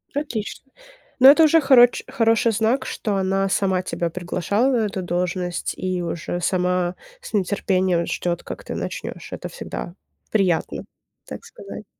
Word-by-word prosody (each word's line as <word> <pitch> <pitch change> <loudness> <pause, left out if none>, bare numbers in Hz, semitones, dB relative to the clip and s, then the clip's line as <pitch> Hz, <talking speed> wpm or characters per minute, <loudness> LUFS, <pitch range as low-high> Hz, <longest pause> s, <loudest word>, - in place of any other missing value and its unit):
Отлично. 270 -2 -4 0.5
Но 265 +2 +10
это 320 +3 +6
уже 325 +1 +5
хороч 250 -4 +5
хороший 230 -3 +2
знак, 225 +5 +1
что 210 -4 -2
она 195 0 +1
сама 190 -1 +1
тебя 170 -2 -3
приглашала 180 +8 0
на 225 -4 +2
эту 195 -2 -4
должность 180 0 -2
и 185 -1 -2
уже 170 +1 -4
сама 180 -1 0 0.3
с - - -11
нетерпением 185 -3 +1
ждёт, 175 -1 -2
как - - -8
ты - - -5
начнёшь. - - -6
Это - - -5
всегда 170 - -7 0.4
приятно, 190 -6 0 0.4
так - - -8
сказать. - - -10
195 Hz, 145 wpm, -22 LUFS, 180-230 Hz, 0.5 s, Но